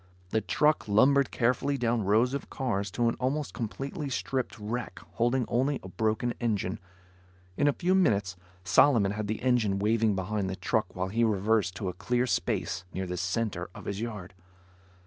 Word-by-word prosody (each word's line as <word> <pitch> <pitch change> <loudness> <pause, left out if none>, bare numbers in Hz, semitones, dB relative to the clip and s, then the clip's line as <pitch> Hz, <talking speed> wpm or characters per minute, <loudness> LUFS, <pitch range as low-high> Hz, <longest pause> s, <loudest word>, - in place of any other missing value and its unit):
The 110 - +1
truck 150 +6 +2
lumbered 135 +6 +4
carefully 130 +4 +1
down 120 -3 0
rows 110 +6 +3
of 140 - -4
cars 105 -7 -2
to 120 +5 0
an 115 - +2
almost 140 +3 -1
completely 135 +5 -4
stripped 130 -1 -2
wreck 110 -1 -4 0.2
holding 120 +2 +1
only 135 +4 +1
a 95 - -8
broken 110 +4 0
engine. 105 -5 -1 0.8
In 145 - +2
a 145 - +4
few 180 +4 +1
minutes, 100 - +2 0.3
Solomon 100 +3 +4
had 105 0 -3
the 110 +3 -3
engine 120 -6 +2
waving 110 +1 +2
behind 95 +1 -2
the 95 - -3
truck 110 +1 -1
while 95 0 -2
he 115 +4 +1
reversed 105 -3 +1
to 100 - -4
a 90 - -2
clear 125 +7 0
space 95 -6 -1
near 95 - -3
the 90 0 -4
center 95 0 -2
of - - -10
his 100 +1 -3
yard. 105 -6 -6
110 Hz, 175 wpm, -29 LUFS, 100-125 Hz, 0.8 s, lumbered